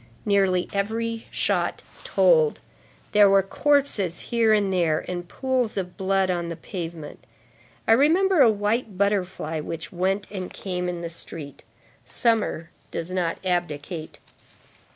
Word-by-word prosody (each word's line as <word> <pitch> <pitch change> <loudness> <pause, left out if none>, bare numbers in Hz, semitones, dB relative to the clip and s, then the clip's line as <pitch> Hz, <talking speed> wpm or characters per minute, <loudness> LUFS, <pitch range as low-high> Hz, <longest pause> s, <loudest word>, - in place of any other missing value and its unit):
Nearly 195 -3 +2
every 225 +3 -2
shot - - 0 0.2
told. 480 -2 +3 0.5
There 205 -1 +6
were 195 0 +5
corpses 250 - +1
here 230 -2 +3
and 205 -3 +2
there, 165 -4 +1
and 175 -1 -5
pools 255 -5 -1
of 180 -2 -3
blood 190 -1 +1
on 170 -1 -2
the 170 - -4
pavement. 165 -4 -7 0.6
I - - +4
remember 325 +8 +4
a 245 - +8
white 210 0 -1
butterfly 185 -5 0
which 160 +2 -6
went 190 +3 0
and 185 -3 -5
came 180 -2 -3
in 175 -1 -4
the 170 - -4
street. 150 -4 -8 0.4
Summer 220 - 0 0.2
does 165 +2 -5
not 180 -3 -1
abdicate. 170 -2 -3
195 Hz, 130 wpm, -24 LUFS, 175-220 Hz, 0.6 s, a